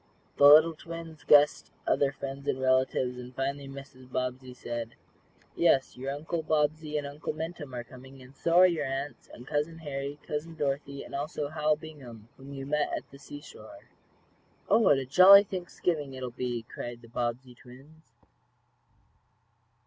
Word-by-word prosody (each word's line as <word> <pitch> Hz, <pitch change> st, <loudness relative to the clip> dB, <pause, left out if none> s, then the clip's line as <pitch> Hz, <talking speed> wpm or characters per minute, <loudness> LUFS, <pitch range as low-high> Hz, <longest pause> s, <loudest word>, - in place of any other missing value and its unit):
The 140 Hz, -, +8 dB
little 155 Hz, +3 st, +8 dB
twins 165 Hz, -1 st, -9 dB
guessed 145 Hz, 0 st, +5 dB, 0.2 s
other 140 Hz, -1 st, +2 dB
friends 135 Hz, 0 st, -7 dB
and 130 Hz, -, 0 dB
relatives, 130 Hz, -1 st, +1 dB
and 125 Hz, 0 st, -10 dB
finally 140 Hz, +1 st, -3 dB
Mrs. 135 Hz, -2 st, -12 dB
Bobbsey 130 Hz, 0 st, -3 dB
said: 120 Hz, -1 st, -6 dB, 0.6 s
"Yes, 140 Hz, -6 st, +2 dB
your 135 Hz, +2 st, -4 dB
Uncle 160 Hz, +4 st, -3 dB
Bobbsey 155 Hz, 0 st, 0 dB
and 145 Hz, -, -3 dB
Uncle 145 Hz, +2 st, -5 dB
Minturn 160 Hz, -2 st, -6 dB
are 120 Hz, -, -4 dB
coming, 130 Hz, +2 st, -14 dB
and 130 Hz, +1 st, -15 dB
so 165 Hz, +4 st, -1 dB
are 180 Hz, +1 st, +9 dB
your 165 Hz, -6 st, +1 dB
aunts, 135 Hz, +2 st, -5 dB
and 120 Hz, -, -12 dB
Cousin 150 Hz, +3 st, -2 dB
Harry, 140 Hz, -2 st, -5 dB
Cousin 155 Hz, +2 st, -4 dB
Dorothy 140 Hz, -1 st, -3 dB
and -, -, -12 dB
also 145 Hz, +1 st, -3 dB
Hal 155 Hz, 0 st, +1 dB
Bingham, 130 Hz, -8 st, -12 dB
whom 135 Hz, +1 st, -12 dB
you 135 Hz, -1 st, -6 dB
met 150 Hz, +1 st, 0 dB
at -, -, -10 dB
the 140 Hz, -, -14 dB
seashore." 145 Hz, -, -12 dB, 0.8 s
"Oh, -, -, +5 dB
what 190 Hz, -11 st, +5 dB
a 135 Hz, -, -3 dB
jolly 190 Hz, +8 st, +9 dB
Thanksgiving 175 Hz, -6 st, -3 dB
it 130 Hz, -, -7 dB
will 125 Hz, -, -4 dB
be!" 120 Hz, -1 st, -3 dB
cried 120 Hz, +1 st, -8 dB
the -, -, -13 dB
Bobbsey 120 Hz, +2 st, -3 dB
twins. 135 Hz, +6 st, -17 dB
140 Hz, 165 wpm, -29 LUFS, 130-155 Hz, 0.8 s, are